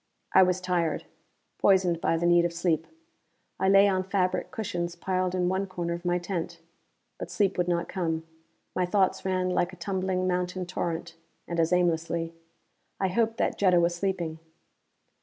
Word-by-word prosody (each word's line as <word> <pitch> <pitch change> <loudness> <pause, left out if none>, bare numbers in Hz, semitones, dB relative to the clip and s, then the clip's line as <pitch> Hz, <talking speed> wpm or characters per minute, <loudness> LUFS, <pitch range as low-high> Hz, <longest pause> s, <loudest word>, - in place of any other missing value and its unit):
I 190 - +8
was 180 0 +3
tired, 175 -4 -1 0.5
poisoned 185 -4 +3
by 165 - +2
the 170 - -1
need 175 0 +5
of 170 0 -1
sleep. 165 -2 0 0.7
I 190 - +2
lay 195 +1 +7
on 190 -2 +2
fabric 185 -1 0
cushions 175 -7 -3
piled 185 +1 -1
in 180 -1 +1
one 190 +2 0
corner 175 -2 -3
of 170 +1 -7
my 175 0 +2
tent. 175 -1 -4 0.6
But - - -5
sleep 200 -2 +1
would 180 -1 0
not 170 -1 0
come; 165 -3 -2 0.5
my 180 -1 +1
thoughts 190 0 +1
ran 185 -1 0
like 180 0 0
a - - -11
tumbling 185 +1 -1
mountain 180 0 -1
torrent, 170 -2 -4 0.3
and 170 -1 -3
as 165 +1 +2
aimlessly. 165 -1 +1 0.7
I 190 - +1
hoped 225 +3 +1
that - - 0
Jetta 185 -3 +5
was 170 0 +2
sleeping. 175 -3 -2
180 Hz, 170 wpm, -27 LUFS, 170-185 Hz, 0.7 s, I